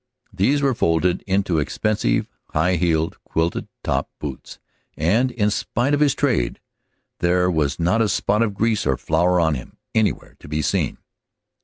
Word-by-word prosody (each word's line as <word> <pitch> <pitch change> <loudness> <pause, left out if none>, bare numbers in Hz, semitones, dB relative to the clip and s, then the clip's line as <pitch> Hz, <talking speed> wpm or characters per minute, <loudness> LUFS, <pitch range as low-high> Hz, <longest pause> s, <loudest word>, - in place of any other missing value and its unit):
These 130 +10 +2
were 135 -1 +3
folded 90 -3 +1
into 95 -4 +1
expensive, 100 - 0 0.3
high 90 +4 +2
heeled, 80 -2 0
quilted 80 +1 -1 0.2
topped - - -2
boots, 70 -3 -7 0.4
and, 110 +12 +2
in 105 -4 0
spite 120 +6 -1
of 145 - +2
his 145 -3 +3
trade, 125 - 0 0.6
there 90 +1 +2
was 75 -4 0
not 90 +7 +2
a 110 - +2
spot 105 +2 +1
of 105 -3 0
grease 110 -4 +1
or 65 -1 +2
flour 90 +1 +2
on 80 -2 +2
him 65 -4 -7 0.2
anywhere 110 -2 0
to - - -13
be 75 +1 -2
seen. - - 0
90 Hz, 160 wpm, -22 LUFS, 80-110 Hz, 0.6 s, were